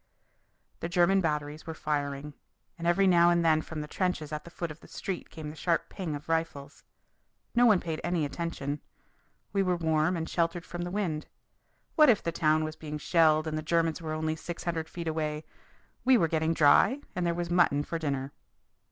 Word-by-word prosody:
The 170 - -4
German 180 +2 +4
batteries 150 -1 -2
were 160 - -5
firing, 145 -1 -3 0.4
and 170 -1 -4
every 175 +3 +4
now 175 -2 +6
and 170 -1 +2
then 155 -1 +4
from 155 -1 -6
the 150 - -6
trenches 180 -3 -2
at 150 0 -5
the - - -9
foot 170 -1 -5
of 155 - -11
the - - -16
street 190 -3 -5
came 155 -2 -7
the - - -12
sharp 170 +1 0
ping 175 -6 -4
of 145 - -9
rifles. 160 -4 -3 0.7
No 245 +1 +5
one 210 -5 +5
paid 160 -2 -4
any 175 -3 0
attention. 145 -2 -4 0.7
We 200 - +2
were 180 -2 +1
warm 160 +1 +1
and 160 0 -3
sheltered 170 0 -1
from 175 0 -6
the 175 - -3
wind. 175 -6 -2 0.7
What 305 -3 +6
if 220 - +4
the 170 - -1
town 155 -1 +2
was 155 0 -4
being 150 -1 -6
shelled 155 0 +3
and 155 -1 -3
the 155 - -2
Germans 165 +1 0
were 155 -1 -4
only 155 0 -1
six 170 +2 -7
hundred 165 -2 -2
feet 170 -2 -6
away? 155 -1 -2 0.6
We 255 0 +6
were 165 - +3
getting 160 +1 0
dry, 160 - +5
and 180 - -1
there 170 -1 +1
was 175 0 -3
mutton 165 -5 +3
for 165 +2 -4
dinner. 140 -3 -2
165 Hz, 205 wpm, -29 LUFS, 155-175 Hz, 0.7 s, now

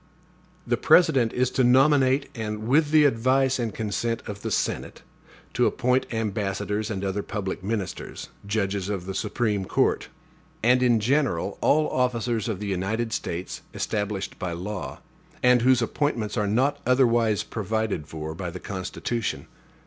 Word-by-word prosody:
The - - +1
President 135 -10 +4
is 125 0 0
to 130 - +2
nominate, 135 +1 +4
and, 110 -2 -4
with 145 +4 +3
the 155 -1 +5
advice 130 +1 +2
and 115 -2 -1
consent 115 +2 -2
of 100 -2 -7
the - - -3
Senate, - - -2 0.5
to - - +3
appoint 125 +1 0
ambassadors 105 -1 -2
and 100 -2 -3
other 100 +1 -1
public 100 -3 -4
ministers, 105 -2 -4
judges 100 -2 -1
of 95 -4 -3
the 95 - -4
Supreme 105 -1 -1
Court, - - +1 0.6
and 125 +2 +4
in 120 -3 +4
general 120 - 0
all 155 +1 +3
officers 120 -3 0
of 105 -4 -3
the 105 - -5
United 105 +4 -2
States 85 -2 -4
established 105 -2 -3
by 90 -3 -3
law, 95 +3 -5 0.4
and 125 -1 +5
whose 125 0 +4
appointments 115 -5 -1
are 105 -3 0
not 130 +7 +1
otherwise 120 -4 +3
provided 110 -6 -2
for 80 0 -6
by 85 +2 -5
the - - -7
Constitution. 100 +4 -4
110 Hz, 150 wpm, -25 LUFS, 100-125 Hz, 0.6 s, the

